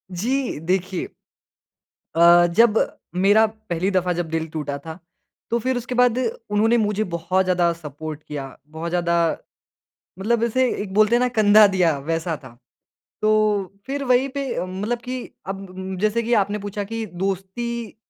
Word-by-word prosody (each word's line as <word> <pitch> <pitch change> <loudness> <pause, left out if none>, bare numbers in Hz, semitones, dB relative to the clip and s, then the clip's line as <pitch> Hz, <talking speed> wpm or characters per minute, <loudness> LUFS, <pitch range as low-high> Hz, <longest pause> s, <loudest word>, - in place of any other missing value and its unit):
जी, 240 - -2
देखिए 185 +2 -1 1.1
अ, 170 +1 +7
जब 230 -1 +5 0.4
मेरा 205 +4 +5 0.2
पहली 175 +3 0
दफ़ा 180 -1 +1
जब 170 -1 -3
दिल 160 0 -2
टूटा 150 -2 -4
था, 160 +4 -9 0.5
तो 235 - +1
फिर 255 +2 -1
उसके 250 +1 -4
बाद 245 -1 +4 0.3
उन्होंने 220 +3 +3
मुझे 210 -1 +1
बहुत 175 +3 +1
ज़्यादा 180 -2 +2
सपोर्ट 155 -1 -8
किया, 140 -3 -7
बहुत 160 +2 -5
ज़्यादा 170 0 0 1.0
मतलब 225 +4 0
ऐसे 255 +2 +2
एक 195 -2 -7
बोलते 215 +2 +4
है - - +2
ना 250 - +2
कंधा 215 -3 +6
दिया, 170 -5 +3
वैसा 165 +3 -2
था। 120 -2 -13 0.7
तो 215 -3 +2
फिर 280 +1 -3
वहीं 255 +1 +3
पे, 275 -7 -3
मतलब 205 +6 -3
कि 250 +2 -5 0.3
अब 195 0 -4 0.2
म 190 0 -5
जैसे 215 +3 +1
कि 235 +1 -2
आपने 205 +2 -3
पूछा 205 0 -4
कि, 225 +2 -4
दोस्ती 195 +5 -4
195 Hz, 155 wpm, -22 LUFS, 170-230 Hz, 1.1 s, अ